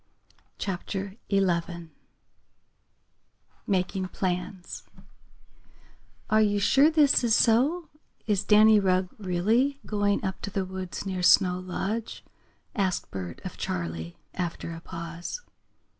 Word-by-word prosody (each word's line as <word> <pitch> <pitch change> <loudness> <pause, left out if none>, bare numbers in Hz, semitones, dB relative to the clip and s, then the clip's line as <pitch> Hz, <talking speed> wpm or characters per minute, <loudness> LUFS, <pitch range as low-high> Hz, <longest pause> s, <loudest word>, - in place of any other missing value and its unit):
CHAPTER 195 +1 -4
XI 170 -4 0 1.8
MAKING 190 0 0
PLANS 180 0 -4 1.5
"Are 215 0 +4
you 205 -1 +2
sure 270 +8 +5
this 300 -5 +4
is 230 -2 +4
so 275 +11 +3 0.4
is 205 -2 +1
Danny 215 0 +6
Rugg 185 -1 +1
really 220 +9 +1
going 205 -1 0
up 190 0 -3
to - - -4
the 195 -1 -2
woods 185 0 -6
near 185 -2 -3
Snow 180 0 +5
Lodge?" 195 +5 -4 0.5
asked 190 -4 -1
Bert 90 -3 -6
of - - -6
Charley, 85 -1 -4 0.2
after 170 -2 -4
a 165 - -8
pause. 170 - -6
190 Hz, 110 wpm, -27 LUFS, 180-215 Hz, 1.8 s, Danny